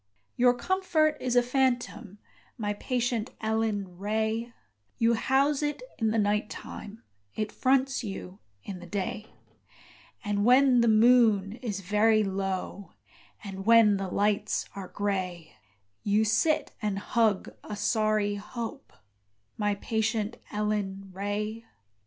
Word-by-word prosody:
Your 245 0 +4
comfort 320 -1 +1
is 250 -1 -1
a 245 - +5
phantom, 245 -5 -1 0.4
My 210 -3 -1
patient 240 +1 -1
Ellen 215 -5 -2
Ray; 220 +3 -1 0.5
You 230 0 +3
house 270 +5 +2
it 295 +10 -2 0.2
in 220 -2 +2
the 220 - 0
night 210 0 +1
time, 210 +2 -9 0.3
It 215 -1 -2
fronts 265 +2 +1
you 195 -2 -7 0.2
in 190 -2 -7
the 175 - -11
day; 205 +3 -3 1.0
And 205 0 0
when 250 +1 +5
the 235 - +3
moon 220 -3 +5
is 205 -6 -3
very 215 +3 +3
low 195 0 -3 0.5
And 195 -2 -6
when 225 -3 +6
the 195 0 -3
lights 205 +2 0
are 195 -2 -6
grey, 185 - -3 0.5
You 210 +2 +2
sit 305 +9 +2
and 210 -2 -1
hug 215 -1 +1
a 210 - -6
sorry 215 0 +1
hope, 230 +5 -6 0.6
My 205 -1 0
patient 220 +1 -1
Ellen 205 -2 -2
Ray! 210 +3 -3
215 Hz, 125 wpm, -28 LUFS, 200-235 Hz, 1.0 s, when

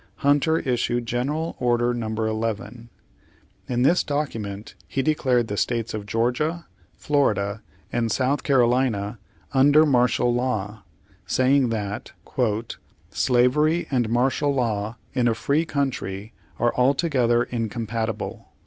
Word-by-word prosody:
Hunter 145 +3 +3
issued 120 -3 -1
General 145 +8 -2
Order 120 -1 +2
No. 120 -2 -3
11. 110 +1 -3 0.8
In 125 0 +1
this 170 +7 +4
document 115 -9 -4
he 135 - -1
de 155 - +3
clared 125 -5 +1
the 105 - -4
states 115 0 -1
of 105 -1 -5
Georgia, 130 +10 -1 0.3
Florida, 105 -8 0 0.3
and 115 -2 0
South 135 +1 +1
Carolina 120 -5 +1 0.3
under 145 +3 +6
martial 125 -3 +2
law, 110 -4 -2 0.5
saying 130 0 +3
that 105 -3 -4 1.0
"slavery 140 +7 +2
and 120 -4 +1
martial 130 +4 +1
law 110 -4 -1 0.2
in 125 -2 +2
a 115 - +2
free 145 +7 +1
country 115 -8 -3 0.2
are 120 - +1
altogether 125 -3 +2
incompatible. 115 -2 -4
120 Hz, 115 wpm, -24 LUFS, 115-140 Hz, 1.0 s, under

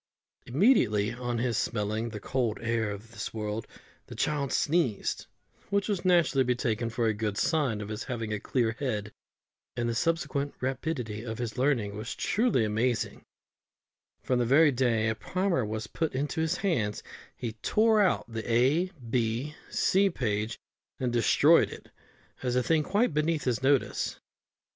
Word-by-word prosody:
Immediately 120 - +3
on 120 0 -3
his 120 -1 0
smelling 110 +1 -1
the 105 -2 -6
cold 120 0 -1
air 115 -1 0
of 105 +3 -8
this 110 0 -6
world 105 0 -3 0.4
the - - -9
child 145 -3 -1
sneezed, 145 - 0 0.4
which 200 0 +1
was 200 -4 -1
naturally 150 -9 +3
taken 115 -2 -1
to 115 +1 -2
be 115 - +3
a - - -2
good 105 -1 -2
sign 135 -10 +1
of 105 - -6
his 110 +1 -5
having 115 -4 -3
a 105 - -2
clear 115 +1 0
head; 105 -7 -2 0.7
and 120 -1 0
the 115 - 0
subsequent 145 0 -1
rapidity 130 -4 -3
of 110 -2 -5
his 115 -2 -4
learning 125 -6 +1
was 110 +3 -5
truly 215 - +1
amazing, 110 +3 -1 1.0
for - - -1
on 125 - +3
the 120 - +2
very 145 +4 +6
first 125 - -7
day 115 -4 +2
a 110 - +2
primer 180 - -1
was 110 0 -3
put 160 +5 -3
into 145 +4 -1
his 160 -1 0
hands 115 - -1 0.3
he 120 - -3
tore 220 0 +3
out 190 - +2
the 115 0 -5
A, 130 +9 +3 0.2
B, 120 +4 -1 0.2
C 195 +1 +3
page 110 - -2 0.4
and 125 -2 -1
destroyed 120 -2 +5
it, - - -11 0.5
as 125 -1 -1
a 125 - +2
thing 160 +2 +3
quite 200 +4 +1
beneath 150 0 +1
his 125 -3 0
notice. 135 0 +1
120 Hz, 165 wpm, -29 LUFS, 110-150 Hz, 1.0 s, very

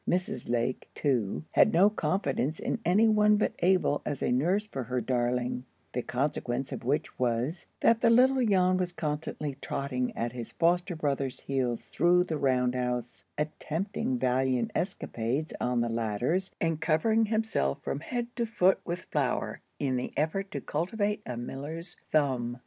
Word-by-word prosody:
Mrs. 180 -10 -1
Lake, 120 +1 -1
too, 115 - 0
had - - +5
no 185 +4 +6
confidence 155 - -1
in - - -2
any 195 +7 +4
one 210 -1 +5
but 210 - +1
Abel 180 -5 +3
as 145 - -3
a - - +1
nurse 175 +12 +2
for 135 - -5
her 125 +2 -1
darling; 125 +1 0 0.3
the 125 - 0
consequence 130 0 -2
of - - -5
which 145 +6 -1
was, 125 +7 -1
that 230 0 +4
the - - +5
little 255 +2 +5
Jan 185 -4 +3
was 180 -1 -1
constantly 150 -3 -3
trotting 130 -2 -2
at 120 +1 -1
his 120 -1 -7
foster 175 +2 +2
brother's 140 -4 -2
heels 130 -4 -1
through 175 +3 +4
the 160 -4 -3
round 125 -2 +2
house, 125 -1 -3
attempting 155 0 -2
valiant 130 0 +1
escalades 145 - -2
on 125 -1 +1
the 120 - +1
ladders, 115 - 0
and 165 -2 0
covering 220 +8 +3
himself 220 - 0
from 140 - -2
head 240 - -3
to 235 -1 0
foot 190 -4 +3
with 175 +1 -3
flour - - -1 0.2
in 130 -2 0
the 125 - -3
effort 175 +7 0
to - - -4
cultivate 205 +6 -1
a 125 - -4
miller's 145 +8 -6 0.2
thumb. 125 -5 +1
150 Hz, 160 wpm, -29 LUFS, 125-185 Hz, 0.3 s, no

